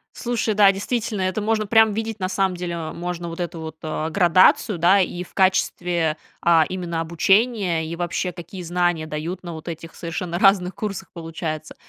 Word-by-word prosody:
Слушай, 235 -2 -1
да, 205 -1 +6
действительно, 210 +1 -2
это 185 +3 -1
можно 215 0 0
прям 220 +1 +5
видеть, 225 0 -3
на 185 -1 -1
самом 190 -1 0
деле, 175 -1 -4
э, 160 -2 -5
можно 175 0 -4
вот 165 - -8
эту 175 -1 -4
вот, 160 -1 -7
э, 155 0 -3
градацию, 185 +2 +4
да, 175 +4 +5
и 180 -1 -2
в - - -18
качестве, 175 -4 +1 0.2
а, 165 -2 +4
именно 175 -3 -3
обучения, 190 +1 +2
и 165 - -4
вообще 175 +1 -2
какие 175 +2 -9
знания 175 -2 0
дают 155 +4 -4
на 175 -2 -7
вот 160 +1 -10
этих 165 0 -7
совершенно 170 +1 -4
разных 190 -1 +3
курсах, 195 -3 -5
получается. 160 -2 -5
180 Hz, 180 wpm, -22 LUFS, 165-195 Hz, 0.2 s, да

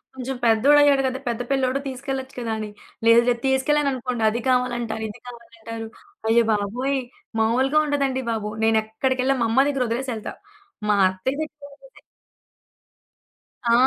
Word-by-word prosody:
కొంచెం 265 0 -4
పెద్దోడుయ్యాడు 275 +5 +5
గదా! 260 0 -3
పెద్ద 235 0 -2
పిల్లోడు 265 0 +1
తీసుకెళ్ళొచ్చు 265 0 -5
కదా!" 230 -2 -2
అని, 215 - -5 0.4
లేదు 230 +1 +7
లేదు 235 -1 0
తీసుకెళ్ళాననుకోండి 265 -3 0
అది 235 +3 -3
కావాలంటారు, 240 -3 0
ఇది 205 - -10
కావాలంటారు. 230 -1 -9 0.4
అయ్య 235 +1 +5
బాబోయ్! 245 +7 -1 0.4
మామూలుగా 260 +7 +3
ఉండదండి 275 -2 0
బాబు! 215 -2 -3
నేనెక్కడికెళ్ళా 255 +5 +1
మా 230 - +2
అమ్మ 265 +4 +4
దగ్గర 275 -3 0
వదిలేసి 250 +3 -2
ఎళ్తా. 215 - -6 0.6
మా 210 - +4
అత్తయ్య 225 +10 -3
దగ్గర 295 -2 -11 0.2
అయితే - - -19 1.7
ఆ! 235 - +5
250 Hz, 135 wpm, -23 LUFS, 225-270 Hz, 1.7 s, లేదు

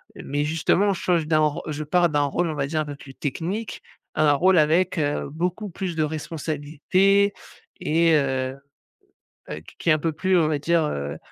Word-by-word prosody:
Mais 145 +1 -3
justement 165 +6 +2
je 180 - -6
change 170 -3 +1
d'un 155 -1 +3
ro 150 -1 +1
je 155 0 -3
pars 175 +3 +3
d'un 145 -1 +1
rôle 165 +5 0
on - - -2
va 140 -1 -1
dire 155 +1 -1
un - - -3
peu 145 -1 -6
plus 135 -1 -12
technique, 180 - -4 0.3
un 150 -1 +3
rôle 185 +6 +4
avec, 170 +4 +3
heu, 145 -2 -1
beaucoup 180 +7 -3
plus 180 -1 -4
de 155 - +1
responsabilités 160 +6 +1 0.5
et 165 +1 +3
heu, 130 -2 0 0.9
heu, 75 - -5
qu - - -16
qui - - -1
est - - +7
un 155 - +1
peu 165 +2 -1
plus 185 +4 +2
on 160 - +2
va 155 -1 0
dire, 165 +2 +1
heu, 70 - -4
155 Hz, 200 wpm, -24 LUFS, 145-175 Hz, 0.9 s, est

